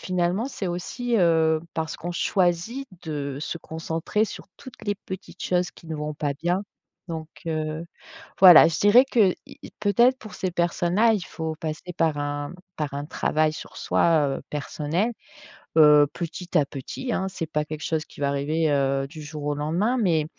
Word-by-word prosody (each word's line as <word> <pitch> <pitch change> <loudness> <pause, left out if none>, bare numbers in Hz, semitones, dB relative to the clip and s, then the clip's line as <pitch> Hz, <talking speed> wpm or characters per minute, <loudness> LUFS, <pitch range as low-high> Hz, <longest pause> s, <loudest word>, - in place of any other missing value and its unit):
finalement 185 +5 0
c'est 200 - -5
aussi, 235 +8 -3
heu, 160 -3 +3
parce 160 0 -3
qu'on 175 +2 -5
choisit 185 +10 0 0.2
de 140 -3 -4
se 160 - -4
concentrer 165 +6 -2
sur - - -8
toutes 260 -3 -13
les 205 - +1
petites 190 -1 -7
choses 180 -2 +1
qui 165 - -17
ne 160 - -4
vont 150 0 -4
pas 145 -1 -1
bien. 180 +3 +1 0.5
Donc 160 -1 -4 0.2
heu, 155 0 -2 0.6
voilà, 180 -4 +10
je 165 - -2
dirais 215 +6 +7
que, 210 -6 +5 0.2
y - - -13
y - - -9
peut-être 240 +5 +4
pour 215 -4 -11
ces 185 - -2
personnes 175 +1 0
là, 225 +1 +5
il 190 -6 -2
faut 160 -1 -4
passer 160 +3 -5
par 160 -3 +1
un 145 0 -3 0.2
par 150 -3 -3
un 145 - -3
travail 155 0 +1
sur - - -9
soi, 160 -3 +2
heu, - - -9
personnel, 155 +9 -1 0.7
heu, 150 -2 +7
petit 175 +1 -3
à 150 - +4
petit 150 - -5
hein, 190 - -1
c'est 185 -3 -4
pas 150 -1 -1
quelque 155 +1 -7
chose 160 -1 -1
qui - - -16
va 140 - +2
arriver, 150 +3 0
heu, 135 -1 +1
du 155 +1 -10
jour 150 0 -7
au 145 - 0
lendemain, 175 - 0
mais 165 -7 +2
165 Hz, 185 wpm, -25 LUFS, 150-185 Hz, 0.7 s, voilà